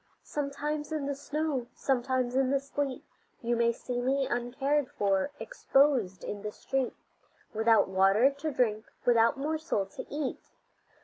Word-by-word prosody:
Sometimes 295 +1 -3
in 305 -3 -2
the 280 - -1
snow, 285 -2 -2
sometimes 255 -1 0
in 265 -1 +3
the 275 0 +2
sleet; 275 -1 -3 0.4
You 235 +1 +1
may 235 0 +3
see 245 +1 -4
me 270 +2 +1
uncared 265 +4 0
for, 195 +3 +1
exposed 270 - +2
in 205 - -5
the 210 - -4
street 265 +3 -2 0.6
Without 225 +1 +4
water 195 +7 +4
to 285 +3 -4
drink, 220 -5 +1 0.2
without 235 +1 +4
morsel 305 -7 -1
to 195 - -8
eat. 290 -2 -2
260 Hz, 140 wpm, -30 LUFS, 230-285 Hz, 0.6 s, Without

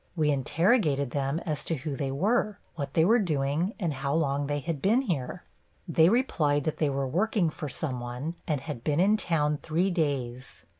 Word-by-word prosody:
We 155 -3 +2
interrogated 145 - +2
them 140 +2 -1
as 155 -3 -2
to 165 - -1
who 140 0 -4
they 135 -1 -2
were, 210 - +1 0.2
what 140 -4 -5
they 160 - +5
were 230 +6 +5
doing 155 +1 0
and 170 -7 -1
how 140 +2 -2
long 145 -3 0
they 145 0 -1
had 150 0 -3
been 225 +7 +3
here. 175 - -3 0.4
They 165 0 +5
replied 155 - +2
that 155 - -2
they 150 - +1
were 135 -1 -1
working 180 - +1
for 150 -1 -6
some 130 -2 -3
one 125 +6 -4
and 150 -4 0
had 140 -5 -6
been 150 0 +1
in 200 +4 +5
town 150 -7 0
three 175 +5 0
days. 135 - -3
150 Hz, 195 wpm, -28 LUFS, 140-175 Hz, 0.4 s, they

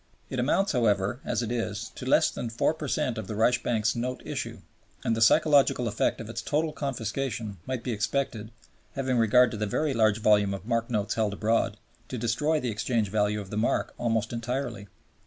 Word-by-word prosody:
It 130 - -2
amounts, 190 +10 +2
however, 105 -3 +1
as - - -1
it 115 - -3
is, 115 -2 -3
to 130 - -7
less 155 +4 +4
than 120 - -4
4 115 +6 +1
per 155 -2 -6
cent 130 -6 -1
of 105 - -6
the 105 - -4
Reichsbank's 115 -1 +2
Note 125 +2 -3
Issue, - - -5 0.4
and 115 - +1
the 115 - -2
psychological 135 0 +4
effect 105 0 0
of 115 - -6
its 115 0 -4
total 155 +1 0
confiscation 120 -5 -3
might 130 -2 -3
be 125 - -2
expected 110 0 -2 0.5
(having 130 -3 0
regard 125 +3 +5
to 110 - -5
the 105 0 -1
very 150 +7 0
large 110 -3 +3
volume 105 -2 +3
of 100 - -9
mark 115 0 0
notes 105 -3 0
held 110 -2 0
abroad) 110 +3 +1 0.3
to 125 - -5
destroy 120 +7 +1
the 125 -4 -2
exchange 110 -1 0
value 105 +1 +1
of 100 -2 -8
the 105 - -3
mark 110 - 0
almost 115 -1 0
entirely. 120 -3 -3
115 Hz, 195 wpm, -27 LUFS, 110-130 Hz, 0.5 s, regard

